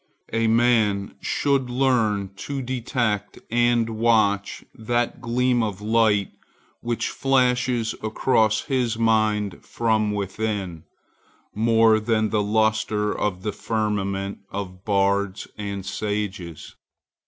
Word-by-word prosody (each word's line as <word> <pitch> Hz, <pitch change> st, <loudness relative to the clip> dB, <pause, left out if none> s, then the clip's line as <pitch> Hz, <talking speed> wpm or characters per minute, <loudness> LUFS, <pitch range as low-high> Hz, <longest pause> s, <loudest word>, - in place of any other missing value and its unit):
A 115 Hz, 0 st, +2 dB
man 110 Hz, -4 st, +2 dB
should 140 Hz, -3 st, 0 dB
learn 115 Hz, -6 st, +1 dB
to 140 Hz, +3 st, -4 dB
detect 120 Hz, -4 st, -2 dB
and 120 Hz, -1 st, +3 dB
watch 110 Hz, -3 st, +1 dB
that 120 Hz, +2 st, -2 dB
gleam 125 Hz, 0 st, +1 dB
of 105 Hz, -4 st, -2 dB
light 105 Hz, -2 st, +2 dB, 0.5 s
which 120 Hz, -1 st, -2 dB
flashes 125 Hz, -3 st, +1 dB
across 110 Hz, 0 st, +2 dB
his 125 Hz, -4 st, -1 dB
mind 110 Hz, -3 st, +1 dB
from 110 Hz, -2 st, 0 dB
within, 100 Hz, -4 st, -3 dB, 0.7 s
more 115 Hz, 0 st, +4 dB
than 110 Hz, 0 st, 0 dB
the 105 Hz, -, +2 dB
lustre 110 Hz, 0 st, +1 dB
of 95 Hz, -3 st, -2 dB
the 105 Hz, -, -1 dB
firmament 100 Hz, -3 st, -2 dB
of 95 Hz, -2 st, -6 dB
bards 100 Hz, -1 st, 0 dB
and 100 Hz, -2 st, -5 dB
sages. 100 Hz, -5 st, -4 dB
110 Hz, 105 wpm, -23 LUFS, 100-120 Hz, 0.7 s, more